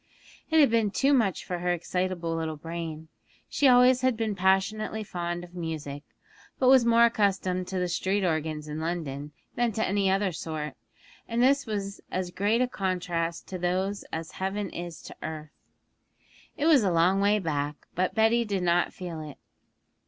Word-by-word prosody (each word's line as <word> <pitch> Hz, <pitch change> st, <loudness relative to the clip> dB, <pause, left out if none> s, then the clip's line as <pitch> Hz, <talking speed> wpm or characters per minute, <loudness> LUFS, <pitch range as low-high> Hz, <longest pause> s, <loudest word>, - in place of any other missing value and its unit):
It 320 Hz, 0 st, +4 dB
had 280 Hz, -6 st, +6 dB
been 225 Hz, -2 st, +3 dB
too 275 Hz, +7 st, +2 dB
much 220 Hz, -9 st, +1 dB
for 180 Hz, -1 st, -3 dB
her 180 Hz, 0 st, 0 dB
excitable 175 Hz, -1 st, -2 dB
little 160 Hz, -1 st, -3 dB
brain; 160 Hz, 0 st, -6 dB, 0.4 s
she 285 Hz, -, +2 dB
always 250 Hz, 0 st, +6 dB
had 255 Hz, -3 st, +2 dB
been 220 Hz, -2 st, -1 dB
passionately 195 Hz, +3 st, +1 dB
fond 175 Hz, -2 st, -4 dB
of 175 Hz, 0 st, -12 dB
music, 155 Hz, -5 st, -5 dB, 0.6 s
but 255 Hz, -, +3 dB
was 260 Hz, -2 st, +7 dB
more 235 Hz, 0 st, +6 dB
accustomed 190 Hz, -5 st, 0 dB
to 190 Hz, -, -3 dB
the 180 Hz, 0 st, 0 dB
street 190 Hz, +3 st, 0 dB
organs 155 Hz, -2 st, -2 dB
in 150 Hz, +1 st, -5 dB
London 155 Hz, -4 st, -4 dB, 0.2 s
than 240 Hz, -1 st, +1 dB
to 220 Hz, -, 0 dB
any 195 Hz, 0 st, +1 dB
other 195 Hz, 0 st, +1 dB
sort, 155 Hz, -3 st, -5 dB, 0.5 s
and 235 Hz, +1 st, +1 dB
this 275 Hz, 0 st, +3 dB
was 200 Hz, -2 st, -4 dB
as 185 Hz, -1 st, -3 dB
great 210 Hz, +6 st, +1 dB
a -, -, 0 dB
contrast 180 Hz, -5 st, -2 dB
to 185 Hz, -, -5 dB
those 185 Hz, +3 st, -1 dB
as 160 Hz, 0 st, -5 dB
heaven 195 Hz, 0 st, -3 dB
is 175 Hz, -1 st, -7 dB
to -, -, -10 dB
earth. 155 Hz, -1 st, -6 dB, 1.1 s
It 290 Hz, -, -1 dB
was 310 Hz, -5 st, +6 dB
a 200 Hz, -, +2 dB
long 175 Hz, +4 st, +3 dB
way 205 Hz, +1 st, +4 dB
back, 150 Hz, -5 st, -2 dB, 0.2 s
but 185 Hz, +1 st, -1 dB
Betty 225 Hz, +2 st, +4 dB
did 200 Hz, -4 st, -2 dB
not 175 Hz, 0 st, +2 dB
feel 175 Hz, -4 st, -6 dB
it. 150 Hz, -3 st, -9 dB
185 Hz, 175 wpm, -27 LUFS, 165-215 Hz, 1.1 s, was